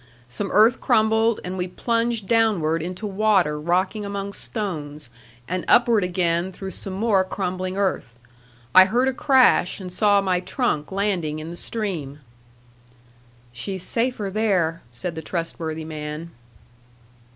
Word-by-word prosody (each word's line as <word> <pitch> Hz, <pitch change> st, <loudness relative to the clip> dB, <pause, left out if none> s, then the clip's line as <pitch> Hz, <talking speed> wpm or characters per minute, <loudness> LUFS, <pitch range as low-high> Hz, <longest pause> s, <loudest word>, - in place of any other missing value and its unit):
Some 195 Hz, +10 st, -4 dB
earth 220 Hz, +3 st, +5 dB
crumbled, 220 Hz, +1 st, +3 dB
and 185 Hz, +1 st, -5 dB
we 180 Hz, -, -1 dB
plunged 230 Hz, +2 st, -1 dB
downward 200 Hz, -9 st, +2 dB
into 180 Hz, +5 st, -5 dB
water 195 Hz, -7 st, +2 dB
rocking 185 Hz, +6 st, 0 dB
among 200 Hz, 0 st, -4 dB
stones, 150 Hz, -, -5 dB, 0.4 s
and 185 Hz, 0 st, -2 dB
upward 235 Hz, -4 st, +5 dB
again 175 Hz, 0 st, 0 dB
through 190 Hz, +1 st, -7 dB
some 190 Hz, +2 st, -6 dB
more 200 Hz, -1 st, +2 dB
crumbling 185 Hz, 0 st, -3 dB
earth. 185 Hz, -12 st, -1 dB, 0.6 s
I 185 Hz, 0 st, +9 dB
heard 240 Hz, +6 st, +1 dB
a 265 Hz, -, +1 dB
crash, 260 Hz, -9 st, +3 dB
and 180 Hz, -2 st, -7 dB
saw 205 Hz, +1 st, +4 dB
my 185 Hz, -2 st, +1 dB
trunk 180 Hz, -, -2 dB
landing 190 Hz, -6 st, -1 dB
in 155 Hz, +2 st, -7 dB
the -, -, -7 dB
stream. 175 Hz, -10 st, -4 dB, 1.4 s
"She's 180 Hz, +10 st, -5 dB
safer 230 Hz, -4 st, -1 dB
there," 185 Hz, -6 st, +1 dB
said 120 Hz, +9 st, -5 dB
the 160 Hz, -, -6 dB
trustworthy 160 Hz, -1 st, -4 dB
man. 155 Hz, +1 st, -6 dB
185 Hz, 135 wpm, -23 LUFS, 165-215 Hz, 1.4 s, I